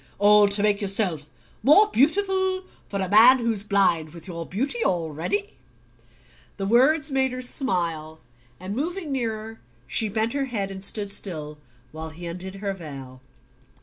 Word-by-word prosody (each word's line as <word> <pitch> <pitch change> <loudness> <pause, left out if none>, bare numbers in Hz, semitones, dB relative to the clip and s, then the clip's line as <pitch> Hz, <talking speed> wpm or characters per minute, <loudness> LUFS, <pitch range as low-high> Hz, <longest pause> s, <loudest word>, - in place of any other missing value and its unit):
"All 205 +1 +6
to 200 0 -1
make 210 0 +2
yourself 190 -7 -1 0.3
more 315 +10 +6
beautiful 375 +5 +1 0.3
for 200 - -3
a 190 - -1
man 225 +7 +8
who's 230 -4 -1
blind 180 -6 +1
with 170 +2 -9
your 170 -2 -6
beauty 275 - -2
already?" 175 +1 -2 1.0
The 195 - -3
words 285 +8 +3
made 265 -1 +1
her 255 - -5
smile, 170 - -2 0.4
and 190 +3 -6
moving 330 +3 -3
nearer 225 -3 -4 0.3
she 215 - -1
bent 220 +2 -1
her 280 -1 -1
head 205 -6 -3
and 190 0 -7
stood 205 0 -2
still 155 -7 -4 0.3
while 160 +1 -7
he 165 +3 -10
undid 180 +3 -6
her 195 0 -3
veil. 135 -7 -10
200 Hz, 150 wpm, -24 LUFS, 175-250 Hz, 1.0 s, man